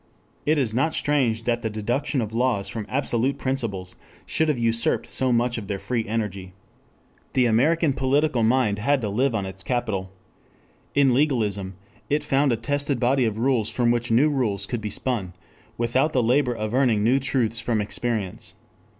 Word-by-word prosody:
It 155 +1 +3
is 125 -6 0
not 155 +7 +1
strange 125 -7 +1
that 120 0 0
the 110 - -2
deduction 120 +6 -1
of 110 -1 -4
laws 115 -4 0
from 105 +1 -5
absolute 130 -1 0
principles 105 -9 -3 0.3
should 160 - 0
have 150 -4 +1
usurped 115 0 +1
so 130 -1 0
much 120 0 +1
of 100 - -9
their 100 -1 -2
free 115 +2 -2
energy. 100 -4 -3 0.8
The 130 - +3
American 145 +7 +3
political 135 0 +1
mind 110 -3 +2
had 140 +6 +2
to 105 - -2
live 125 +4 +1
on 100 -3 -1
its 95 0 -7
capital. 105 -5 -2 0.8
In 140 -3 +4
legalism 105 -9 0 0.3
it 150 +1 +1
found 135 0 +2
a 115 - +1
tested 145 0 -1
body 125 +1 +2
of 110 -2 -2
rules 115 -3 +1
from 120 0 +1
which 120 0 -1
new 125 +7 +4
rules 105 -8 -1
could 120 0 -4
be 105 - -3
spun 105 -7 -2 0.4
without 130 +6 +1
the 125 - +2
labor 125 +1 +2
of 110 0 -4
earning 125 -5 +2
new 125 +5 +3
truths 120 -4 +1
from 115 -1 -1
experience. 105 -2 -3
120 Hz, 175 wpm, -24 LUFS, 110-135 Hz, 0.8 s, In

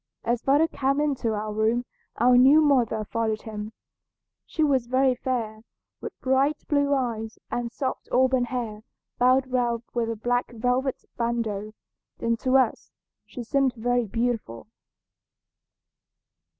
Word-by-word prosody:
As 240 0 0
father 290 +4 +3
came 275 -2 0
into 265 -7 0
our 210 0 -4
room 220 +3 +1 0.3
our 245 +2 +5
new 265 +5 +7
mother 245 -8 +2
followed 220 0 -2
him. 215 -1 -6 0.8
She 315 - -1
was 265 -5 +2
very 260 +1 +3
fair, 235 -4 -3 0.4
with - - -8
bright 270 +3 +2
blue 285 -1 +2
eyes, 230 -4 -3
and 240 -1 -2
soft 260 +1 -4
auburn 260 -1 +3
hair 230 -4 -4 0.4
bound 255 +1 +3
round 240 -2 0
with 235 -2 -1
a 230 - -2
black 245 +2 -1
velvet 250 +3 -1
bandeau, 220 -3 -2 0.4
and 230 0 -1
to 260 +1 +3
us 255 -4 0 0.4
she 245 - -7
seemed 265 +1 +1
very 245 0 0
beautiful. 230 - -2
245 Hz, 135 wpm, -25 LUFS, 225-260 Hz, 0.8 s, new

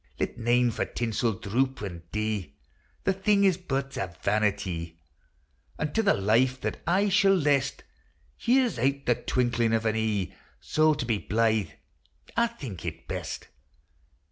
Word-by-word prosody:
Let - - -1
nane 120 +1 +2
for - - -1
tinsel 115 0 -1
droop 130 +7 -1
an' 90 -4 -5
dee, 105 -8 -2 0.5
The 195 - +2
thing 200 +1 +2
is 190 -3 +5
but 135 -6 -3
a 95 - -1 0.2
vanitee; 95 -6 0 0.8
And 150 -1 -2
to 225 - +3
the 205 - +3
life 120 +6 +2
that - - -3
aye 195 +4 +3
shall 195 0 +5
lest 140 -5 +1 0.5
Here 255 +1 +3
's 225 - -5
out 140 +3 0
the 120 - +4
twinkling 120 -1 0
of 115 0 +1
an 110 0 +1
ee: 110 -4 -1 0.3
So 155 0 +2
to 145 -4 -3
be 115 -3 0
blythe 110 -1 +1 0.7
I 235 - +3
think 135 - -8
it - - -6
best. - - -5
120 Hz, 155 wpm, -27 LUFS, 110-155 Hz, 0.8 s, is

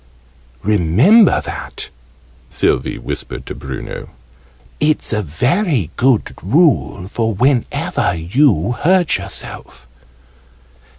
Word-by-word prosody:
"Remember 110 - +4
that!" - - -7 0.6
Sylvie - - 0
whispered 65 +1 -6
to - - -6
Bruno, 65 -2 -7 0.7
"It's 150 -5 +1
a 105 - 0
very 125 - 0
good 125 -3 +1
rule 125 - +2
for 110 +1 -2
whenever 125 -6 0
you 90 - +2
hurt 175 +6 +2
yourself." 65 -1 -8
115 Hz, 85 wpm, -17 LUFS, -, 0.7 s, Remember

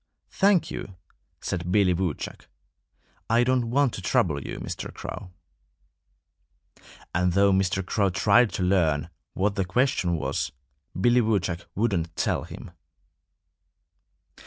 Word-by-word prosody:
"Thank 190 -5 +3
you!" 95 - -7 0.5
said 90 0 -3
Billy 95 -2 +4
Woodchuck. 85 -3 -4 0.8
"I 115 +2 +4
don't 125 -2 +1
want 135 0 +2
to - - -6
trouble 75 -5 +1
you, - - -6
Mr. - - -6
Crow." 95 - -7 1.8
And 90 +1 +1
though 100 +1 +4
Mr. 95 0 +1
Crow 100 0 +1
tried 105 +5 +4
to 90 - -1
learn 85 -4 +1 0.2
what 100 +2 +1
the 100 -1 0
question 95 -2 +1
was, 75 - -2 0.5
Billy 120 +5 +4
Woodchuck 95 -6 -1
wouldn't 90 -6 -1
tell - - -1
him. - - -10
95 Hz, 120 wpm, -26 LUFS, 90-115 Hz, 1.8 s, Billy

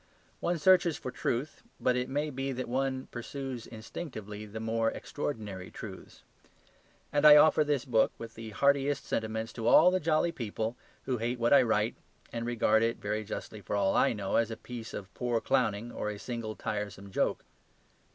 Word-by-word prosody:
One 175 0 0
searches 175 0 +4
for 125 - -5
truth, 125 +6 -2 0.2
but 125 - +2
it 125 0 -1
may 150 +2 -1
be 135 +1 -3
that 130 0 -4
one 130 +1 -1
pursues 130 0 -6
instinctively 110 - -7
the 110 +2 -7
more 115 0 +1
extraordinary 105 -12 -5
truths. - - -10 0.9
And 145 - +2
I 150 -1 +11
offer 155 0 +6
this 145 -2 0
book 115 -4 +3
with 115 -1 -8
the 115 0 -8
heartiest 140 +4 +2
sentiments 110 0 -2
to 115 -1 -3
all 175 +8 +7
the 185 - +2
jolly 160 +1 +2
people 115 -4 -3 0.3
who 130 -2 -1
hate 120 +2 -1
what 120 +2 +3
I 140 - +8
write, 110 -2 +1 0.4
and 115 0 -3
regard 110 -2 +3
it 115 0 +1
(very 105 +1 -2
justly, 105 0 -6
for 100 - -3
all 100 -1 +2
I - - +4
know), 100 -3 -1
as 115 -1 +2
a 110 - -5
piece 120 -2 -8
of 95 -1 -8
poor 120 -2 0
clowning 120 -3 0
or 105 - -3
a 105 - -5
single 115 -1 -5
tiresome 105 -2 -4
joke. - - 0
115 Hz, 180 wpm, -30 LUFS, 110-135 Hz, 0.9 s, I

